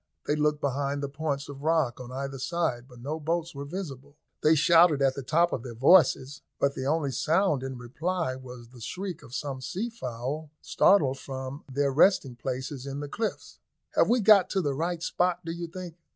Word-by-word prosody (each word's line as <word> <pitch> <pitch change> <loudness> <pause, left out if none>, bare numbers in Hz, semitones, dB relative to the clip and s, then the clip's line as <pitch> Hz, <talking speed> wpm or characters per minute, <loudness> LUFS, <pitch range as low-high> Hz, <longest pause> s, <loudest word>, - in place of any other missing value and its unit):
They 150 - +1
looked 150 0 +1
behind 140 +1 -1
the - - -1
points 140 0 -3
of 140 -1 -9
rock 155 -6 +1
on 125 0 -8
either 135 +1 -5
side, 145 -5 -1
but 125 -2 -15
no 150 +5 -4
boats 170 +2 -2
were 140 0 -6
visible. 145 -4 -7 0.3
They 155 +1 +5
shouted 165 0 +5
at 135 -1 +3
the 140 - -5
top 165 +6 +2
of 125 - -2
their 120 -1 -8
voices, 140 0 +4 0.2
but 140 0 +2
the 130 0 -4
only 150 -2 +1
sound 155 - +1
in 130 -1 -5
reply 150 +4 -2
was 125 -2 -11
the 125 -1 -15
shriek 185 - -5
of 120 - -10
some 135 -3 -4
sea 215 - -3
fowl, 135 - -5
startled 140 -9 +3
from 130 +1 -7
their 140 +1 +1
resting 140 -3 +4
places 130 +2 -5
in 140 +1 -4
the 145 - -5
cliffs. 220 +9 -4 0.3
"Have - - +3
we 240 0 +3
got 205 -3 +6
to 195 - +1
the 145 -4 -1
right 165 +3 -2
spot, 180 0 0
do 165 - -3
you 170 0 -5
think?" 175 -1 -8
145 Hz, 200 wpm, -28 LUFS, 130-170 Hz, 0.3 s, got